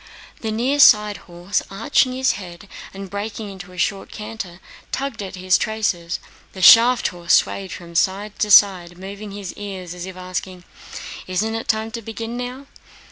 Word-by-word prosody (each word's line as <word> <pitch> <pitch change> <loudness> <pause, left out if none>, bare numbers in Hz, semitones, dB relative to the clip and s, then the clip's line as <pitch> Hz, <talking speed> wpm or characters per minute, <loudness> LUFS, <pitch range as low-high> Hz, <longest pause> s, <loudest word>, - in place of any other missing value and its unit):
The 220 - -3
near 255 +6 0
side 210 -6 +6
horse, 175 +3 -2
arching 255 +5 +1
his 260 +1 +2
head 185 0 -9 0.2
and 195 0 -8
breaking 205 +1 -5
into 185 -1 -10
a 180 - -13
short 195 +2 -1
canter, 210 -5 -7 0.3
tugged 270 -5 -3
at 195 -1 -6
his 185 0 +2
traces. 200 -7 -1 0.3
The 190 - -8
shaft 235 +4 +8
horse 175 -1 -1
swayed 195 -1 0
from 170 -1 -9
side 195 +4 0
to 210 - +1
side, 185 -4 +5
moving 200 +3 -8
his 200 -2 -7
ears 190 -4 -7
as 180 +1 -7
if 185 -1 -9
asking: 185 0 -5 0.6
"Isn't 195 +5 -1
it 225 - -4
time 220 0 0
to 230 0 -5
begin 225 +1 -6
now?" 250 +3 -5
200 Hz, 170 wpm, -21 LUFS, 185-225 Hz, 0.6 s, shaft